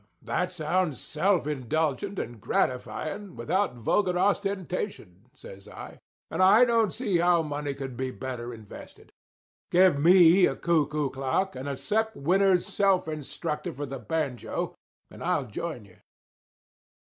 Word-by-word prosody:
"That 180 0 -1
sounds 175 -2 -1
self 175 +1 0
indulgent 150 - -1
and 120 - -5
gratifying 155 - -2
without 195 -8 -1
vulgar 180 - +1
ostentation," 190 - -2
says 100 -5 -13
I; - - -10 0.3
"and - - -1
I 205 +6 +7
don't 230 -4 +2
see 205 -8 0
how 175 -1 +3
money 145 -2 -4
could 135 -2 -6
be 130 +1 -3
better 125 -2 -6
invested. 110 -3 -12 0.6
Give 180 -4 +4
me 175 +3 +7
a - - -2
cuckoo 150 -4 0
clock 135 +8 -1
and 130 +2 -5
a 140 - -3
Sep 220 +4 -1
Winner's 185 +4 +3
Self 195 -4 +1
Instructor 150 0 -4
for 145 +3 -5
the 135 -1 -6
Banjo, 130 0 -3 0.4
and - - -10
I'll - - 0
join 125 +1 -6
you." 95 -2 -20
160 Hz, 135 wpm, -27 LUFS, 130-190 Hz, 0.6 s, I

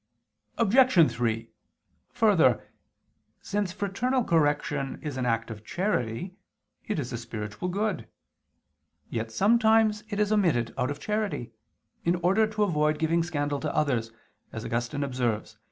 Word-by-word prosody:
Obj. 230 - +5
3: 115 -1 -1 0.6
Further, - - +3 0.7
since 200 -2 -2
fraternal 235 +7 0
correction 145 -5 +1
is 150 -3 -4
an 130 -1 -1
act 115 0 0
of 105 -1 -9
charity, 175 - -2 0.5
it 215 - -1
is 125 -5 -3
a 120 - -3
spiritual 115 +6 -5
good. 205 +2 -2 1.0
Yet 110 0 -3
sometimes 220 - +3
it 205 -1 -3
is 210 0 +2
omitted 165 - +2
out 130 - 0
of 145 - -4
charity, 210 - -2 0.5
in 170 +1 +2
order 200 +5 +4
to 215 -1 0
avoid 150 -5 +1
giving 160 +2 +1
scandal 145 -4 -2
to 155 0 -3
others, 120 -7 0 0.4
as 110 - -6
Augustine 120 +5 -2
observes 125 -6 -1
(De 110 - -26
Civ. - - -44
155 Hz, 140 wpm, -27 LUFS, -, 1.0 s, Obj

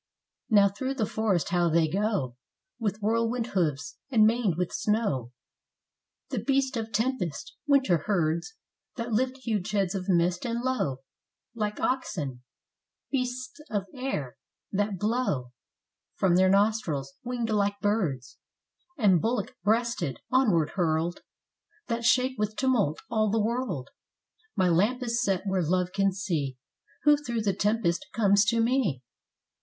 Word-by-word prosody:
Now 205 -3 +6
through 260 +7 -3
the 225 -5 0
forest 205 -7 0
how 175 -1 +2
they 160 0 +3
go, 190 - -1 0.4
With 210 -2 -2
whirlwind 230 +2 +1
hoofs, 155 -7 -1
and 225 -5 +5
maned 220 -5 +2
with 180 -1 -1
snow, 205 - 0 1.0
The - - -1
beasts 270 -1 +1
of 225 -1 -3
tempest! 215 - -2
winter 265 - +4
herds, 170 - 0 0.4
That 235 -1 -4
lift 255 +4 +1
huge 215 -4 -1
heads 195 -4 0
of 190 0 -4
mist 175 0 +2
and 235 -1 -2
low 245 - -1 0.5
Like 210 -2 -3
oxen; 150 - -2 0.7
beasts 255 0 -3
of 205 -3 -1
air, 250 - -4 0.3
that 205 0 0
blow 215 - 0
Ice 125 - -18 0.7
from 185 -3 +3
their 185 +1 +5
nostrils; 195 -9 +1
winged 240 -2 -2
like 200 -1 +1
birds, 175 - -1 0.6
And 195 - +4
bullock 240 +2 -1
breasted, 215 - 0
onward 210 - +3
hurled, 170 -1 0 0.7
That 230 0 -1
shake 255 0 +3
with 210 0 -1
tumult 235 - +1
all 215 -1 +2
the 225 +2 +1
world.... 215 - -2 0.7
My 190 -3 +3
lamp 210 +10 +2
is 235 0 0
set 195 -4 0
where 190 -2 +1
love 180 +2 0
can 195 0 +2
see, 160 -9 -2 0.5
Who 295 0 +7
through 240 -6 -3
the 200 -2 +1
tempest 205 -3 0
comes 200 -2 +4
to 230 +3 +2
me. 225 - +1
205 Hz, 140 wpm, -28 LUFS, 175-235 Hz, 1.0 s, Who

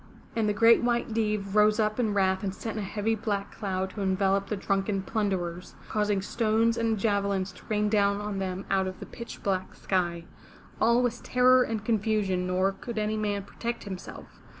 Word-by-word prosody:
And 220 -2 +1
the - - +2
Great 230 +2 +6
White 240 0 +1
Deev 210 -3 -1
rose 210 +1 +5
up 215 +1 +1
in 215 -4 +1
wrath 190 0 +2
and 195 -1 -2
sent 225 -2 -5
a 215 - -2
heavy 210 +3 -1
black 205 -2 -2
cloud 190 -2 -3
to 205 - -6
envelope 195 0 +1
the 210 - -1
drunken 195 0 -1
plunderers, 185 -5 -2
causing 210 -2 0
stones 225 +1 +2
and 230 -1 0
javelins 200 -2 0
to 180 - -16
rain 210 -1 +1
down 200 -1 +2
on 205 -1 -3
them 190 0 -3
out 190 -1 +2
of 185 0 -6
the - - -7
pitch 235 - -9
black 190 -2 -1
sky. 175 -3 -1 0.5
All 235 +2 +4
was 240 -1 -1
terror 255 0 +5
and 220 -3 -2
confusion, 210 -5 +1
nor 185 +1 +2
could 225 +4 -7
any 215 0 0
man 205 -2 -1
protect 235 +4 -5
himself. 190 -2 -9
205 Hz, 190 wpm, -28 LUFS, 195-220 Hz, 0.5 s, Great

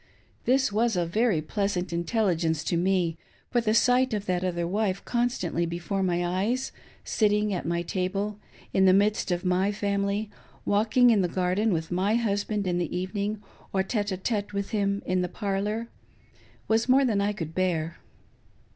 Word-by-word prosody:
This 265 -1 +3
was 225 +1 +1
very 175 0 +1
pleasant 185 0 -2
intelligence 170 -4 0
to - - -1
me; 175 -2 +1 0.3
for 240 - +2
the 220 -1 +1
sight 250 0 +3
of 205 -1 -4
that 180 -2 0
other 175 -2 -1
wife 195 0 -1
constantly 235 -9 0
before 175 +4 -3
my 175 -2 +1
eyes 205 +9 -1 0.2
— - - -26
sitting 210 -1 +1
at 180 - -3
my 170 0 0
table, 195 +4 -2 0.3
in 190 - +4
the 185 - +6
midst 205 +1 +2
of 175 0 -1
my 185 +2 +2
family, 200 +1 -1 0.3
walking 225 +4 +4
in 210 -3 +4
the 180 - +1
garden 185 +5 0
with 165 -1 -2
my 190 +5 +1
husband 205 -2 0
in 175 -1 0
the 175 0 -2
evening, 205 +3 -3 0.3
or 190 -1 +2
iiie 205 0 -1
d 190 - -1
iSte 205 +1 -2
with 200 0 -3
him 200 -2 0
in 185 0 +1
the 180 - -2
parlor: 205 +3 -2 0.8
was 225 +3 +1
more 270 +2 +5
than 215 -5 +1
I 205 +1 +1
could 165 -6 -5
bear. 170 -3 -1
200 Hz, 175 wpm, -27 LUFS, 180-215 Hz, 0.8 s, the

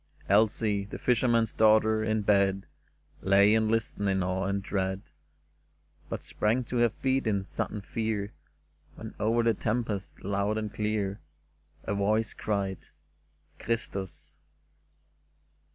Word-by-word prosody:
Elsie, 105 0 +2
the 100 - -7
fisherman's 115 -2 +2
daughter, 110 0 +4
in 110 -1 0
bed 100 -1 +2 0.6
Lay 100 +2 +5
and 110 -1 +2
listened 110 -3 0
in 95 -1 +1
awe 95 +1 -1
and 100 0 -1
dread, 95 0 -2 1.1
But - - -4
sprang 115 +4 0
to 125 +1 -4
her 120 0 +4
feet 130 +1 -1
in 100 -3 0
sudden 105 +1 -3
fear 110 -1 -3 0.6
When - - -8
over 115 +3 +2
the 115 0 +3
tempest, 110 -2 -3
loud 100 +2 0
and 105 -2 -4
clear, 105 -2 -1 0.6
A - - -2
voice 105 +2 +1
cried, 100 -3 -3 0.3
' 75 0 -41
' 75 0 -37
Christus 100 -5 -4
105 Hz, 130 wpm, -28 LUFS, 100-110 Hz, 1.1 s, Lay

